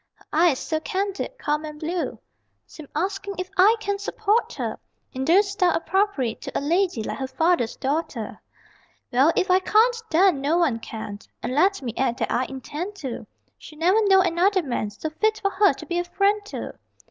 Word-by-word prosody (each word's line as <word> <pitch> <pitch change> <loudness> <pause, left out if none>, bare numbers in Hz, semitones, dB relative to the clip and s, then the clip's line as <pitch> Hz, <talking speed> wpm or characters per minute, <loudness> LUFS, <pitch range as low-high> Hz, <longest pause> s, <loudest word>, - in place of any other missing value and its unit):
Her - - -25
eyes, 320 -3 +4
so 315 +3 -2
candid, 395 +8 -3
calm 300 -6 -1
and 300 -1 -8
blue, 340 +3 -3 0.5
Seem 310 -3 -12
asking 390 +4 -2
if 370 0 -5
I 400 +5 +6
can 405 -2 -2
support 440 +2 0
her - - -4 0.3
In 260 - -3
the 360 +7 +5
style 390 -3 +1
appropriate 365 - 0
to - - -4
A - - +1
lady 335 - +1
like - - -5
her 265 - -2
father's 265 -2 +1
daughter. 270 -6 -3 0.7
Well, 270 +6 +4
if 370 - +1
I 370 - +6
can't 460 +5 +3
then 345 -3 +4
no 300 +5 +2
one 295 -10 +2
can 215 -2 -7 0.2
And 240 - -2
let 375 +3 +2
me 235 -3 -3
add 250 -2 0
that - - -2
I 255 - +1
intend 295 +9 -6
to: 265 -10 -6 0.3
She'll 305 - -13
never 370 +7 +3
know 385 -1 +6
another 370 +2 +2
man 240 -6 -2
So 305 +10 -6
fit 435 +7 0
for 395 - 0
her 400 +1 +4
to - - -10
be 345 -1 -1
a - - 0
friend 400 +4 +1
to. 415 - -7
345 Hz, 195 wpm, -24 LUFS, 280-395 Hz, 0.7 s, I